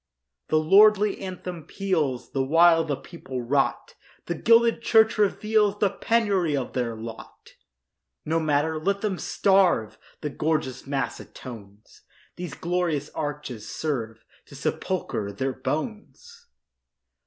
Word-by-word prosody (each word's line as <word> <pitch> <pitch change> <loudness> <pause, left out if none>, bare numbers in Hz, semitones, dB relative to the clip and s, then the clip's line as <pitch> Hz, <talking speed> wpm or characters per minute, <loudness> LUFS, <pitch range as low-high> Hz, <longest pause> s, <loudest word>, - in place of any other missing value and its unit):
The 155 - +2
lordly 205 +5 +5
anthem 180 -3 -6
peals 160 -11 -2
The 135 - 0
while 165 +3 +5
the 150 -3 -2
people 130 -5 -7
rot; 135 +3 0 0.3
The 170 - -2
gilded 230 +6 +4
church 220 -1 +4
reveals 210 0 +2
The 205 -2 +2
penury 200 -10 +1
of 130 - -4
their 120 -3 -2
lot. 115 0 -10 0.7
No 165 +1 +1
matter—let 160 +5 0
them 200 -4 -2
starve! 190 - +2 0.2
The 150 - -3
gorgeous 150 -4 -2
mass 135 -1 -2
atones; 105 -4 -12 0.3
These 175 -4 -6
glorious 170 -4 -1
arches 145 -7 -5
serve 115 -8 -4 0.2
To - - -13
sepulchre 100 -2 -2
their 130 +6 -2
bones. 155 - -6
160 Hz, 120 wpm, -25 LUFS, 135-195 Hz, 0.7 s, lordly